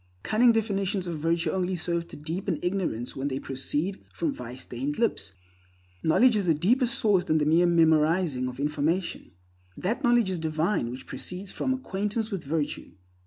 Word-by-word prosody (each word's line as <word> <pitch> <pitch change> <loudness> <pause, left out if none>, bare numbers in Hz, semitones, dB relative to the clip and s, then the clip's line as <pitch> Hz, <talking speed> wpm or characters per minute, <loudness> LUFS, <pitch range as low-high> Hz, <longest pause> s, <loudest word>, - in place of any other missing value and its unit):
Cunning 235 +3 +5
definitions 200 -3 0
of 170 -3 -4
virtue 165 +2 +1
only 185 0 -1
serve 170 0 -2
to - - -10
deepen 165 +6 -3
ignorance 175 - -2
when 135 +1 -2
they 135 -2 -2
proceed 145 +8 -3
from 315 -4 -1
vice 125 - -7
stained 135 +4 -4
lips. 225 - 0 0.7
Knowledge 235 +10 +5
has 205 -4 0
a 165 - +4
deeper 240 - +3
source 205 -6 +2
than 155 - +2
the 150 - +2
mere 165 +3 +4
memorizing 160 -4 +3
of 125 +1 -7
information. 150 +5 -1 0.5
That 210 +6 -2
knowledge 240 -5 +4
is 180 - -2
divine 160 - 0
which 125 +2 -7
proceeds 185 +2 -6
from 260 - -1
acquaintance 220 -3 -2
with 195 -4 -3
virtue. 150 +1 -2
175 Hz, 165 wpm, -27 LUFS, 150-200 Hz, 0.7 s, Cunning